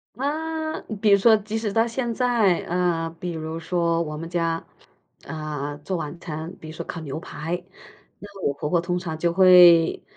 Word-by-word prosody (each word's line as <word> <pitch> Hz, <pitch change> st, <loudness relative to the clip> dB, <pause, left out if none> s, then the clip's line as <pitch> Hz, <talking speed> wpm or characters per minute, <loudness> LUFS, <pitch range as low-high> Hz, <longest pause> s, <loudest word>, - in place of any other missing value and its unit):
啊， 315 Hz, +4 st, -3 dB, 0.2 s
比 215 Hz, -, +3 dB
如 200 Hz, -, +7 dB
说 220 Hz, +2 st, +5 dB
即 215 Hz, +1 st, -4 dB
使 220 Hz, -2 st, -2 dB
到 225 Hz, +3 st, +3 dB
现 235 Hz, +1 st, -2 dB
在， 230 Hz, -7 st, +2 dB
啊， 175 Hz, -2 st, 0 dB
比 180 Hz, -, -4 dB
如 160 Hz, 0 st, -5 dB
说 170 Hz, 0 st, 0 dB
我 150 Hz, -2 st, -4 dB
们 165 Hz, +2 st, -6 dB
家， 165 Hz, -1 st, -1 dB, 0.6 s
啊， 150 Hz, -2 st, -5 dB
做 155 Hz, +6 st, -4 dB
晚 165 Hz, +1 st, -6 dB
餐， 160 Hz, 0 st, -6 dB
比 160 Hz, -, -10 dB
如 155 Hz, -, -8 dB
说 -, -, -5 dB
烤 170 Hz, -, -6 dB
牛 145 Hz, -1 st, -5 dB
排， 170 Hz, +2 st, -5 dB, 0.5 s
那 200 Hz, -1 st, -12 dB
我 140 Hz, -, +1 dB
婆 150 Hz, -, -4 dB
婆 170 Hz, +1 st, +2 dB
通 175 Hz, 0 st, -2 dB
常 165 Hz, -3 st, -5 dB
就 170 Hz, +1 st, +1 dB
会， 175 Hz, -2 st, +6 dB
175 Hz, 200 characters per minute, -24 LUFS, 160-205 Hz, 0.6 s, 如